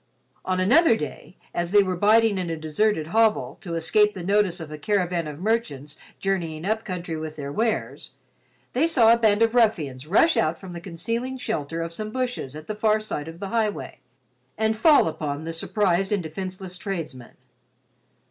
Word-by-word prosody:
On 185 0 0
another 245 - +5
day, 150 +3 -7 0.2
as 175 0 -1
they 205 +1 +5
were 185 -1 -2
biding 215 +2 +4
in 180 -2 -3
a 165 - -3
deserted 155 +2 0
hovel 225 -1 +2
to 170 -4 -5
escape 210 +6 +2
the 180 - -6
notice 195 -1 +2
of 160 -2 -8
a 155 - -6
caravan 180 -2 0
of 150 -1 -7
merchants 175 - -2 0.2
journeying 170 -4 -2
up 220 +2 0
country 180 -3 -5
with 155 0 -6
their 140 -2 -6
wares, 225 +8 -2 0.6
they 280 +7 +3
saw 235 -8 +5
a - - +3
band 220 -1 +3
of 225 0 +2
ruffians 155 - +1
rush 220 - +4
out 160 +1 +1
from 185 -2 -10
the 170 - -7
concealing 230 +9 -4
shelter 165 - -3
of 165 0 -5
some 215 +4 -4
bushes 250 - -3
at 155 0 -9
the 215 - -4
far 215 0 +2
side 160 -8 -5
of 165 +1 -9
the 195 - -5
highway 220 -2 -2 0.6
and 220 0 +1
fall 295 - +5
upon 150 -2 -4
the 165 +1 -5
surprised 190 +2 0
and 200 -4 0
defenseless 185 +2 -6
tradesmen. 160 - -6
185 Hz, 185 wpm, -24 LUFS, 160-220 Hz, 0.6 s, another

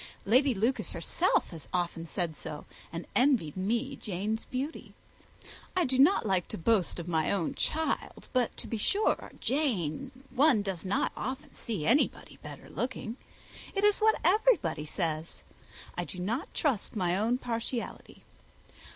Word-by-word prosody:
Lady 255 +4 +4
Lucas 230 +7 0
herself - - +1
has 165 -4 -9
often 170 -2 -1
said 170 -3 -2
so, 150 0 -7 0.3
and 170 +1 -5
envied 245 - +3
me 235 +8 -1
Jane's 210 +3 -3
beauty. 275 +5 -5 0.8
I 360 - +4
do 260 -1 0
not 300 - +6
like 190 -4 +1
to - - -5
boast 185 0 +2
of 170 - -6
my 160 -3 +1
own 190 -5 0
child; 320 0 -1
but 250 -3 +1
to - - -2
be 225 - -3
sure, 410 - +1
Jane 225 - 0 0.2
one 265 -6 +4
does 190 -4 -3
not 195 +1 +1
often 270 +3 -5
see 205 -10 -4
anybody 270 +6 +2
better - - -9
looking. 245 -2 -4 0.6
It 395 - +1
is 415 -1 +5
what 440 0 +4
everybody 330 - +3
says. 160 -1 -3 0.5
I 175 - -1
do 185 - -8
not 225 - -2
trust 260 -10 0
my 180 -4 +1
own 225 +5 +2
partiality. 235 -1 -4
225 Hz, 150 wpm, -30 LUFS, 175-270 Hz, 0.8 s, not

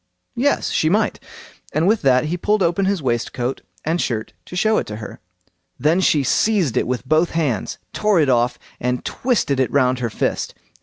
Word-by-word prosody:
"Yes, 280 +4 +1
she 155 - +2
might"; 210 +4 +1 0.5
and 160 +3 +2
with 220 +1 +3
that 130 0 +3
he 160 +3 -1
pulled 205 +3 +1
open 175 +3 +1
his 195 -5 0
waistcoat 120 +1 -2 0.2
and 165 +3 0
shirt 110 -2 -3
to - - -9
show 215 +4 +3
it - - -5
her. 105 0 -7 0.6
Then 160 +5 +2
she 150 -6 +3
seized 180 - +2
it - - +1
with 125 +1 -3
both 155 +4 +3
hands, 135 - -1 0.2
tore 210 -4 +2
it 150 - +3
off, 120 -1 +2 0.2
and 125 0 -2
twisted 225 - 0
it 130 - +2
round 130 -2 +2
her 120 -2 -1
fist. - - -2
155 Hz, 185 wpm, -20 LUFS, 125-190 Hz, 0.6 s, with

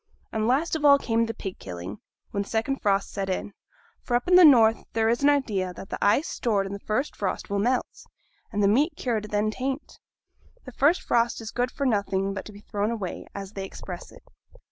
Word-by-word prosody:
And 220 0 -1
last 290 +7 +1
of 310 - -3
all 285 -1 +8
came 230 -4 0
the 225 - -3
pig 195 -3 -6
killing, 90 +3 -7 0.3
when 200 - -1
the 200 - -6
second 235 +5 -1
frost 200 -2 +1
set 195 -1 -3
in. 190 +2 -3 0.5
For 240 - -1
up 245 - 0
in 360 - +2
the 360 0 +9
north 230 -7 +6
there 225 0 +2
is 235 +3 +1
an 285 - +5
idea 205 -11 0
that 190 - -10
the - - -3
ice 240 +10 +3
stored 205 -5 0
in 195 - -5
the 200 - -5
first 235 +8 -2
frost 200 0 -3
will 200 - +1
melt, 245 +5 -1 0.4
and 205 -2 0
the - - +5
meat 280 - +3
cured 225 -4 -1
then 210 +1 +1
taint; 265 +4 -4 0.7
the 255 - -8
first 290 +8 +2
frost 235 0 +1
is 225 -1 -7
good 245 +1 0
for 280 - -3
nothing 195 -4 0
but 195 - -6
to - - -9
be 205 0 -13
thrown 210 0 -2
away, 215 -6 -4
as 195 -1 -6
they 195 -2 -5
express 190 - -8
it. - - -16
220 Hz, 225 wpm, -26 LUFS, 200-255 Hz, 0.7 s, the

